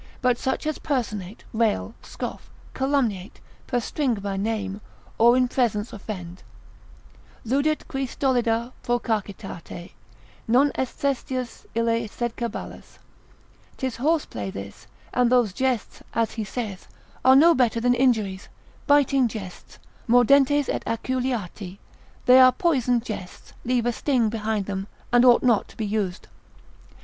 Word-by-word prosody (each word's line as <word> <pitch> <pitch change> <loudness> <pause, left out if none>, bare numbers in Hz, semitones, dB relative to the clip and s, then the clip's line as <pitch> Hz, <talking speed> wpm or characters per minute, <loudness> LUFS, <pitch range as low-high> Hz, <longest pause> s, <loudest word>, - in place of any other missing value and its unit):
but 250 -2 +2
such 265 +5 -2
as 310 -1 -2
personate, 215 - -3
rail, 225 0 0
scoff, - - -7 0.2
calumniate, 245 -8 -1 0.3
perstringe 245 -1 -1
by 200 0 -3
name, 200 -1 -2 0.4
or 235 +2 +6
in 255 -1 +3
presence 235 -4 0
offend; 185 -4 -7 1.0
Ludit 280 +6 0
qui 270 0 -2
stolida 240 -3 0
procacitate 205 -7 -3 0.6
Non 265 +5 +4
est 265 - -1
Sestius 255 -2 -3
ille 230 0 +1
sed 240 +2 -3
caballus: 235 -2 -6 0.8
'Tis 260 -2 -3
horse 305 +5 +1
play 100 -3 -5
this, 100 +1 -9 0.3
and 250 -1 +3
those 240 -6 +3
jests 255 -1 -1
(as 230 -1 +1
he 220 - -4
saith) 205 -2 -5 0.4
are 260 0 +7
no 330 +5 +7
better 245 -5 +2
than 245 +1 +3
injuries, 220 -7 +1 0.4
biting 275 -3 +4
jests, 200 -5 -9 0.3
mordentes 275 +4 +5
et - - -2
aculeati, 230 -6 -3 0.5
they 255 +1 +8
are 255 0 +8
poisoned 250 -8 +1
jests, 190 -5 -8
leave 245 -1 0
a 240 - +2
sting 245 -4 +1
behind 215 -2 -2
them, 195 0 -4 0.3
and 245 0 +6
ought 245 -2 +6
not 235 -5 +3
to - - -18
be 220 - -2
used. 205 -3 -2
235 Hz, 130 wpm, -24 LUFS, 210-260 Hz, 1.0 s, they